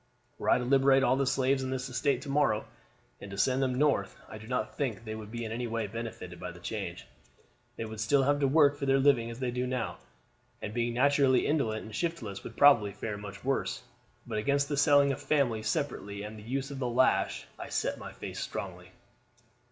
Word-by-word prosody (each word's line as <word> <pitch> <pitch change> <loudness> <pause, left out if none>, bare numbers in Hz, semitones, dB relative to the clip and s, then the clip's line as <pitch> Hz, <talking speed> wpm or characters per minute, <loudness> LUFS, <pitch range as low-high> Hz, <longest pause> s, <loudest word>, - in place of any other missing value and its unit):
Were - - -1
I - - +6
to 125 - -2
liberate 135 +1 +4
all 130 0 +4
the 135 0 0
slaves 135 0 +2
on 130 - -3
this 130 0 -3
estate 130 +1 0
to 145 - -8
morrow 140 -7 +2 0.6
and 100 - -8
to 100 - -7
send 130 +5 +2
them 130 -1 +1
North, 145 +2 +1
I 110 - -9
do 110 - -11
not 125 -3 -2
think 130 -7 -1
that 115 - -17
they 110 - -4
would 110 -1 -7
be 115 +1 -5
in 110 - -5
any 120 +2 -3
way 115 -1 -2
benefited 115 +2 -7
by - - -5
the - - -13
change. - - -5 0.7
They 115 - -4
would 110 -1 -8
still 135 +6 +3
have 145 +1 +2
to 140 - +3
work 145 0 +5
for 140 -1 -4
their 135 0 +4
living 135 -4 +3
as 115 - -7
they 125 -1 -2
do 125 +1 -2
now, 125 -2 -3 0.6
and 105 - -6
being 120 0 -1
naturally 135 0 +4
indolent 120 -8 0
and 110 - -10
shiftless 115 - -3
would - - -9
probably 120 -9 +6
fare 105 +1 -4
much 100 +1 -9
worse. 135 0 -1 0.4
But 105 - -2
against 140 +5 +1
the 145 - 0
selling 145 -1 +5
of 135 - -4
families 120 -7 +1
separately 100 -6 -3
and 105 +1 -7
the 105 - -10
use 135 +1 -2
of 140 - -6
the 125 -2 -1
lash 130 +2 +2
I - - -6
set - - -1
my - - -8
face - - -7
strongly. - - -6
125 Hz, 225 wpm, -30 LUFS, 110-140 Hz, 0.7 s, I